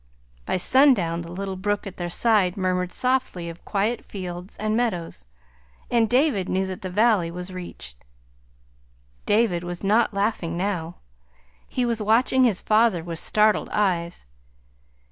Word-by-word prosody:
By -, -, 0 dB
sundown 190 Hz, -, +3 dB
the 170 Hz, 0 st, -9 dB
little 190 Hz, +1 st, -4 dB
brook 205 Hz, +3 st, -2 dB
at 195 Hz, -, -8 dB
their 175 Hz, -1 st, -4 dB
side 205 Hz, -1 st, +2 dB
murmured 180 Hz, -1 st, -1 dB
softly 255 Hz, -9 st, -1 dB
of 165 Hz, +1 st, -11 dB
quiet 215 Hz, +3 st, -1 dB
fields 180 Hz, -1 st, -7 dB
and 215 Hz, +1 st, -1 dB
meadows, 175 Hz, -, -2 dB, 0.6 s
and 230 Hz, -2 st, +3 dB
David 250 Hz, -, +2 dB
knew 190 Hz, +1 st, 0 dB
that 185 Hz, -1 st, -6 dB
the 185 Hz, -, -5 dB
valley 205 Hz, -3 st, +2 dB
was 180 Hz, +2 st, -7 dB
reached. 65 Hz, -, -9 dB, 1.2 s
David 205 Hz, -5 st, +2 dB
was 175 Hz, +1 st, -6 dB
not 215 Hz, +4 st, +3 dB
laughing 200 Hz, -5 st, -1 dB
now. 175 Hz, -3 st, -2 dB, 0.7 s
He 250 Hz, -, -1 dB
was 230 Hz, -2 st, -1 dB
watching 235 Hz, +5 st, +3 dB
his 225 Hz, -7 st, +3 dB
father 215 Hz, -5 st, +2 dB
with 165 Hz, -1 st, -3 dB
startled 215 Hz, +3 st, +2 dB
eyes. 180 Hz, -, -1 dB
195 Hz, 145 wpm, -24 LUFS, 175-220 Hz, 1.2 s, sundown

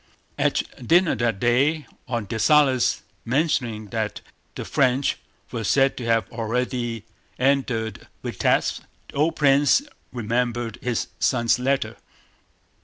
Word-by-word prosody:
At -, -, +2 dB, 0.2 s
dinner 175 Hz, +1 st, +4 dB
that 115 Hz, -3 st, 0 dB
day, 140 Hz, +7 st, +2 dB, 0.2 s
on 120 Hz, -4 st, -2 dB
Dessalles' 130 Hz, +4 st, +3 dB, 0.2 s
mentioning 120 Hz, -6 st, 0 dB
that 110 Hz, -1 st, -3 dB, 0.3 s
the -, -, -5 dB
French 130 Hz, 0 st, +1 dB, 0.3 s
were 115 Hz, -2 st, -3 dB
said 135 Hz, +5 st, +3 dB
to 120 Hz, -, -5 dB
have 115 Hz, -1 st, +2 dB
already 120 Hz, -1 st, -2 dB, 0.3 s
entered 125 Hz, -6 st, 0 dB, 0.2 s
Vítebsk, -, -, 0 dB, 0.3 s
the -, -, -13 dB
old 155 Hz, +4 st, +1 dB
prince 145 Hz, -, +4 dB, 0.3 s
remembered 120 Hz, -1 st, -2 dB
his 125 Hz, -2 st, -1 dB
son's 120 Hz, -1 st, +2 dB
letter. 125 Hz, -4 st, 0 dB
125 Hz, 110 wpm, -23 LUFS, 115-135 Hz, 0.3 s, dinner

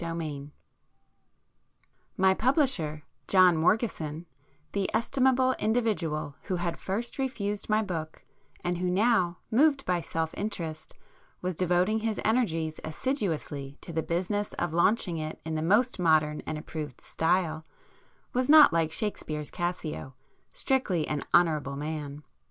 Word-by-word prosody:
[p 170 Hz, -, -3 dB
96]IX 155 Hz, -4 st, -4 dB, 1.7 s
My 190 Hz, 0 st, +5 dB
publisher, 215 Hz, -, +1 dB, 0.2 s
John 185 Hz, -2 st, +6 dB
Morgeson,—the 160 Hz, -, -2 dB
estimable 260 Hz, +2 st, +3 dB
individual 205 Hz, -11 st, 0 dB
who 190 Hz, -, -1 dB
had 175 Hz, -1 st, -2 dB
first 225 Hz, +7 st, -3 dB
refused 210 Hz, -7 st, -2 dB
my 215 Hz, +1 st, +3 dB
book, 165 Hz, -5 st, -5 dB, 0.4 s
and 175 Hz, -1 st, -1 dB
who 180 Hz, 0 st, 0 dB
now, 185 Hz, -3 st, +2 dB
moved 275 Hz, +3 st, +3 dB
by 180 Hz, -1 st, +1 dB
self 160 Hz, 0 st, -3 dB
interest, 165 Hz, -7 st, -5 dB, 0.5 s
was 180 Hz, -1 st, -1 dB
devoting 180 Hz, +5 st, +2 dB
his 220 Hz, -1 st, -2 dB
energies 165 Hz, -9 st, 0 dB
assiduously 155 Hz, -, -3 dB
to 170 Hz, -, -8 dB
the 160 Hz, -, 0 dB
business 190 Hz, +5 st, -2 dB
of 175 Hz, -2 st, -2 dB
launching 175 Hz, -1 st, +2 dB
it 155 Hz, 0 st, -5 dB
in 160 Hz, -, -3 dB
the 155 Hz, -, -1 dB
most 210 Hz, +8 st, +2 dB
modern 155 Hz, -3 st, +3 dB
and 155 Hz, -, -2 dB
approved 150 Hz, -3 st, -6 dB
style, 160 Hz, -1 st, 0 dB, 0.7 s
was 255 Hz, +1 st, 0 dB
not 305 Hz, -, +9 dB
like 165 Hz, -1 st, +1 dB
Shakespeare's 155 Hz, -5 st, -3 dB
Cassio, 175 Hz, -6 st, -4 dB, 0.4 s
strictly 195 Hz, -, 0 dB
'an 150 Hz, -2 st, -2 dB
honourable 155 Hz, -5 st, +3 dB
man. 150 Hz, 0 st, -5 dB
175 Hz, 130 wpm, -28 LUFS, 155-215 Hz, 1.7 s, not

